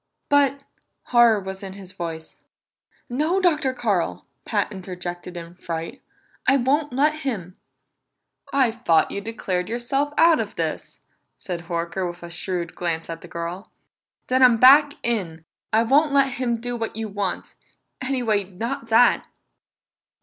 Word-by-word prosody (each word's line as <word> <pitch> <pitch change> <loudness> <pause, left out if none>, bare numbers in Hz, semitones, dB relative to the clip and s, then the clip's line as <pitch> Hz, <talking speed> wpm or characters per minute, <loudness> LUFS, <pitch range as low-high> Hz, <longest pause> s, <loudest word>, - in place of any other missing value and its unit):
"But 280 -1 +3 0.2
" - - -52
Horror 235 -3 +6
was 190 0 -6
in 195 -1 -7
his 190 -2 -9
voice. 165 -3 -7 0.7
"No, 305 +9 0
Dr. 310 -7 +2
Carl!" 185 - -1 0.2
Pat 205 -1 0
interjected 180 -2 -7
in 170 0 -8
fright. 165 -2 -6 0.5
"I 270 +2 +6
won't 285 +4 +1
let 300 +4 +2
him!" 195 - -4 1.0
"I 265 -4 +3
thought 220 -9 +2
you 200 - -4
declared 190 -4 -3
yourself 270 +5 -1
out 330 -1 +6
of - - -4
this," - - -4 0.4
said 175 -2 -6
Horker 170 +1 -2
with 175 0 -10
a 170 - -8
shrewd 175 -1 -3
glance 165 -1 -3
at 165 - -7
the - - -11
girl. 170 +4 -6 0.6
"Then 255 +1 +1
I'm 245 -3 +7
back 285 +4 +7
in 215 -8 0
it! 160 0 -16 0.3
I 220 +1 +4
won't 290 +6 +3
let 275 -1 +4
him 245 -3 -1
do 245 +1 -4
what 230 -1 -4
you 220 0 -3
want 200 -3 -3 0.5
anyway, 245 -6 0
not 230 +6 -5
that!" 230 +2 +4
220 Hz, 150 wpm, -23 LUFS, 180-260 Hz, 1.0 s, I'm